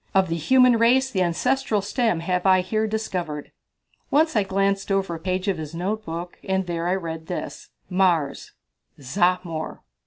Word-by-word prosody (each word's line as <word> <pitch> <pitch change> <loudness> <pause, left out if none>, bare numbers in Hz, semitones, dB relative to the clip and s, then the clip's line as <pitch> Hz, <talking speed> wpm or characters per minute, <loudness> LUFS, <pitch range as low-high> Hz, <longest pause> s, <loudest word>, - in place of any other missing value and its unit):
Of 190 -2 +4
the 165 - 0
human 250 - +4
race 260 +3 +4
the 190 - 0
ancestral 215 +5 +1
stem 220 -4 0
have 180 +1 -1
I 185 -1 +5
here 215 +4 -1
discovered." 180 -9 -4 0.6
Once 315 +1 +3
I 215 - +4
glanced 195 +1 0
over 195 -3 0
a 165 - -5
page 185 +2 -2
of 190 -4 0
his 155 +1 -6
notebook, 175 -2 -4
and 190 -1 0
there 170 -1 -2
I 180 - +2
read 165 -3 -5
this: 180 - -6 0.2
"Mars 180 -6 +1 0.5
Zahmor." 170 +2 -1
185 Hz, 160 wpm, -24 LUFS, 170-215 Hz, 0.6 s, I